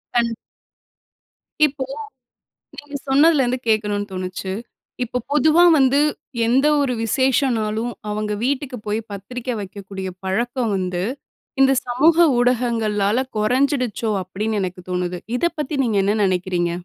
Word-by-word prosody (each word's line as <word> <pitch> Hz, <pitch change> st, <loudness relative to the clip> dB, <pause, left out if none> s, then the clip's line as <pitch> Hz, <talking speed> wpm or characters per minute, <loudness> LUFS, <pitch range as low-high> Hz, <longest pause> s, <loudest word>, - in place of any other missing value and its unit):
கண் 235 Hz, -1 st, +2 dB, 1.3 s
இப்போ 275 Hz, -2 st, -2 dB, 0.9 s
நீங்க 290 Hz, 0 st, -9 dB
சொன்னதுல 285 Hz, +1 st, +5 dB
இருந்து 250 Hz, +1 st, -1 dB
கேட்கணுனு 210 Hz, -2 st, +1 dB
தோணுச்சு. 185 Hz, +1 st, -4 dB, 0.5 s
இப்போ 250 Hz, +1 st, -3 dB
பொதுவா 310 Hz, +4 st, +5 dB
வந்து 270 Hz, +1 st, +4 dB, 0.5 s
எந்த 260 Hz, +5 st, +3 dB
ஒரு 270 Hz, -3 st, +1 dB
விசேஷனாலும் 240 Hz, -2 st, +1 dB, 0.2 s
அவுங்க 210 Hz, 0 st, -2 dB
வீட்டுக்கு 270 Hz, 0 st, -1 dB
போய் 210 Hz, +2 st, 0 dB
பத்திரிக்க 240 Hz, +6 st, -6 dB
வைக்கக்கூடிய 195 Hz, -1 st, -7 dB, 0.2 s
பழக்கம் 235 Hz, +4 st, -1 dB
வந்து, 180 Hz, -1 st, -2 dB, 0.6 s
இந்த 270 Hz, 0 st, +6 dB
சமூக 285 Hz, +7 st, +3 dB, 0.2 s
ஊடகங்களால 235 Hz, -2 st, +1 dB
குறைஞ்சிடுச்சோ! 250 Hz, 0 st, +1 dB
அப்பிடின்னு 205 Hz, +4 st, -2 dB
எனக்கு 180 Hz, 0 st, -5 dB
தோணுது. 180 Hz, 0 st, -2 dB, 0.2 s
இதப்பத்தி 305 Hz, -3 st, -1 dB
நீங்க 220 Hz, -4 st, +1 dB
என்ன 205 Hz, -, +2 dB
நினைக்கிறீங்க? 180 Hz, -2 st, 0 dB
230 Hz, 110 wpm, -21 LUFS, 200-265 Hz, 1.3 s, இந்த